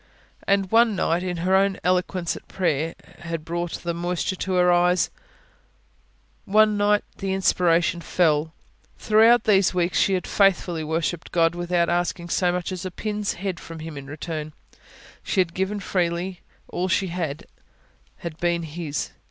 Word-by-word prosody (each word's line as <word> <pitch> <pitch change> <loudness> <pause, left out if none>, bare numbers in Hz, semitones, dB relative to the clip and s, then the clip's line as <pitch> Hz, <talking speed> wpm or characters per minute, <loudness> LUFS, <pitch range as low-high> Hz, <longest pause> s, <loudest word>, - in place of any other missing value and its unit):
And 195 -1 +2
one 225 -1 +5
night, 170 -1 +1
when 180 -1 -3
her 190 +1 +3
own 195 0 +3
eloquence 180 -1 0
at - - -12
prayer 165 -3 -1 0.2
had 165 -2 -5
brought 170 0 -3
the 170 -1 -1
moisture 175 +2 -2
to 190 +1 -3
her 180 -1 +4
eyes 175 0 +3 1.3
one 215 +1 +4
night 205 0 +2
the 195 -1 -2
inspiration 175 -2 +2
fell. 160 -2 +1 0.5
Throughout 225 +2 +5
these 195 -3 +3
weeks, 175 0 +1
she 195 - +3
had 180 - -2
faithfully 180 -4 +2
worshipped 160 +1 -2
God 165 -1 +3
without 175 0 0
asking 175 0 -1
so 180 +1 +2
much 180 +1 -3
as 185 -2 -5
a 185 - -3
pin's 210 +2 -3
head 190 -2 -4
from 165 - -9
Him 160 -1 -7
in 140 -1 -8
return; 155 +1 -5 0.7
she - - -1
had 175 -2 +2
given 190 +3 -2
freely; 180 -1 -2 0.3
all 180 +1 -2
she 190 +1 +1
had, 165 -4 -4 0.7
had 165 -2 -7
been 170 -1 0
His. 155 -2 -4
175 Hz, 160 wpm, -24 LUFS, 170-190 Hz, 1.3 s, one